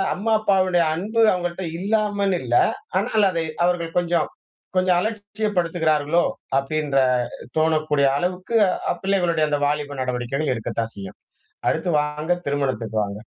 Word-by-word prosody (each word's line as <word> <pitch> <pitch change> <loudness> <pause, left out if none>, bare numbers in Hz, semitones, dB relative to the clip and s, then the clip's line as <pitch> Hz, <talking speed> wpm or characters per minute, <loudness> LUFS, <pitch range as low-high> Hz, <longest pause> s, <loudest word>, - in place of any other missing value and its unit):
அம்மா, 220 +4 0
அப்பாவுடைய 185 -4 +3
அன்பு 215 +6 -1
அவங்கள்ட்ட 175 0 -3
இல்லாமல் 205 -1 +1
இல்ல. 120 -1 -1 0.4
ஆனால் 215 -2 +2
அதை 165 -1 -1 0.2
அவர்கள் 170 -2 -1
கொஞ்சம் 170 -2 0 0.5
கொஞ்சம் 185 -1 +3
அலட்சியப்படுத்துகிறார்களோ, 175 -7 0 0.3
அப்படின்ற 145 0 -1 0.6
தோணக்கூடிய 155 -3 +2
அளவுக்கு 180 +6 -2 0.4
அ - - +1
பிள்ளைகளுடைய 175 -5 +2
அந்த 145 -1 0
வாலிப 145 -1 -2
நடவடிக்கைகள் 130 +3 -1
இருக்கத்தான் 115 0 -3
செய்யும். 95 -1 -9 0.5
அடுத்து 175 - 0
வாங்க, 150 +3 -2
திருமணத்துக்கு 130 -6 -2
வாங்க. 100 +1 -6
170 Hz, 115 wpm, -22 LUFS, 145-185 Hz, 0.6 s, அப்பாவுடைய